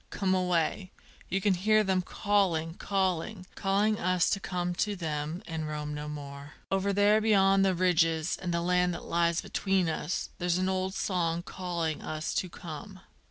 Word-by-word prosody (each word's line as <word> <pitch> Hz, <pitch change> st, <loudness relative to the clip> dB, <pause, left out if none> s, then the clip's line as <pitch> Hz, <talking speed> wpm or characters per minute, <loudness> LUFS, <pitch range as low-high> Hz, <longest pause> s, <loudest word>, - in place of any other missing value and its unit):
come 190 Hz, -2 st, 0 dB
away! 180 Hz, 0 st, 0 dB, 0.4 s
you 195 Hz, -, +1 dB
can 195 Hz, 0 st, +2 dB
hear 215 Hz, +4 st, +3 dB
them 190 Hz, -2 st, +1 dB
calling, 180 Hz, -5 st, 0 dB
calling, 190 Hz, +1 st, -1 dB
Calling 205 Hz, +2 st, +1 dB
us 185 Hz, -1 st, +2 dB
to 200 Hz, -, +1 dB
come 180 Hz, -2 st, -2 dB
to 205 Hz, +3 st, -1 dB
them, 160 Hz, +1 st, -3 dB
and 160 Hz, -2 st, -4 dB
roam 150 Hz, 0 st, -4 dB
no 150 Hz, 0 st, -5 dB
more. 140 Hz, -1 st, -8 dB, 0.2 s
Over 195 Hz, +1 st, +1 dB
there 205 Hz, +2 st, +4 dB
beyond 195 Hz, -3 st, +4 dB
the 190 Hz, -1 st, +2 dB
ridges 165 Hz, -2 st, +2 dB
and 180 Hz, -, -2 dB
the 170 Hz, 0 st, 0 dB
land 180 Hz, 0 st, +2 dB
that -, -, -8 dB
lies 170 Hz, 0 st, +1 dB
between 190 Hz, -3 st, 0 dB
us, 165 Hz, +3 st, -2 dB
There's 175 Hz, -1 st, +1 dB
an 185 Hz, +1 st, +1 dB
old 190 Hz, 0 st, -1 dB
song 170 Hz, -3 st, 0 dB
calling 170 Hz, -4 st, -3 dB
us 155 Hz, +1 st, -3 dB
to 185 Hz, -, -1 dB
come! 175 Hz, +4 st, -9 dB
180 Hz, 170 wpm, -29 LUFS, 165-195 Hz, 0.4 s, there